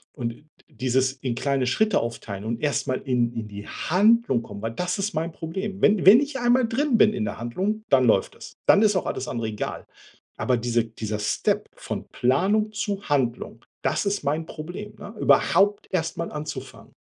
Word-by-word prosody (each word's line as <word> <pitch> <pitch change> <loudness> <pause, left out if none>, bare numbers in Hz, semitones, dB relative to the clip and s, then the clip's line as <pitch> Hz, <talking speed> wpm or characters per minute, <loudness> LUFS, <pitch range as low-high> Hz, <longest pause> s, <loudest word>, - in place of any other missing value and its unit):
Und 120 0 -5 0.3
dieses 130 0 0
in 130 -2 -3
kleine 135 0 0
Schritte 215 - +2
aufteilen 110 -4 -5
und 115 +1 -3
erst 145 -1 0
mal 130 - -1
in 120 -3 0
in 115 -2 -5
die 100 0 -9
Handlung 200 - +2
kommen, 100 -1 -9
weil 115 - -3
das 180 - -2
ist 205 +2 -1
mein 165 +2 -1
Problem. 190 +5 -5
Wenn 210 -3 +4
wenn 205 +6 +10
ich 285 -2 -3
einmal 240 0 +3
drin 255 +2 +1
bin 215 - +6
in 205 +1 -2
'ner - - -4
Handlung, 190 - -2
dann 130 -2 +5
läuft 105 -5 +2
das. - - -11
Dann 205 - +6
ist 210 -2 +4
auch 185 - 0
alles 130 - -3
andere 115 -2 -3
egal. 105 - -5 0.5
Aber 125 - +1
diese 120 0 0
dieser 110 -1 -5
Step 105 - 0
von - - -6
Planung 195 - +2
zu 205 -1 -2
Handlung, 120 -4 -1 0.2
das - - 0
ist 200 -4 -1
mein 155 +3 -1
Problem, 175 +7 -8
ne, 205 +1 -9
überhaupt 205 +1 +3
erst 165 -3 -1
mal 170 - -3
anzufangen. 150 0 -7
155 Hz, 190 wpm, -24 LUFS, -, 0.5 s, wenn